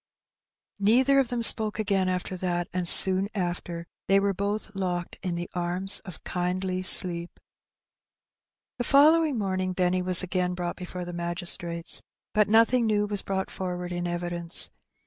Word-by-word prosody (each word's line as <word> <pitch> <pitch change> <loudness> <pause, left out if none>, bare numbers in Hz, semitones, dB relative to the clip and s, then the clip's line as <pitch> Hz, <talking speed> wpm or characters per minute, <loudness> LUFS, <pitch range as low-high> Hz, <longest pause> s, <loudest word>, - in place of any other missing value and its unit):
Neither 255 +7 +4
of 270 - +2
them 235 -1 -2
spoke 215 -2 +7
again 195 -3 0
after 185 0 -3
that, 175 -1 -2
and 180 -1 -1
soon 190 +2 +5
after 175 -2 -4 0.2
they 195 0 +4
were 200 0 0
both 205 +3 -3
locked 180 -3 -3
in 180 -2 -3
the 175 0 -4
arms 180 +3 -1
of 185 -4 -11
kindly 185 +1 -2
sleep. 175 -2 0 1.4
The - - 0
following 300 +2 +4
morning 185 -2 -2
Benny 180 0 +1
was 180 0 +1
again 180 0 -1
brought 175 -1 -4
before 180 -1 -7
the 175 - -7
magistrates, 170 0 -3 0.3
but 210 -1 +3
nothing 230 +2 +4
new 210 -1 +1
was 205 -1 -4
brought 190 -1 -3
forward 180 -1 -5
in 175 0 -3
evidence. 175 0 -3
185 Hz, 150 wpm, -26 LUFS, 175-205 Hz, 1.4 s, spoke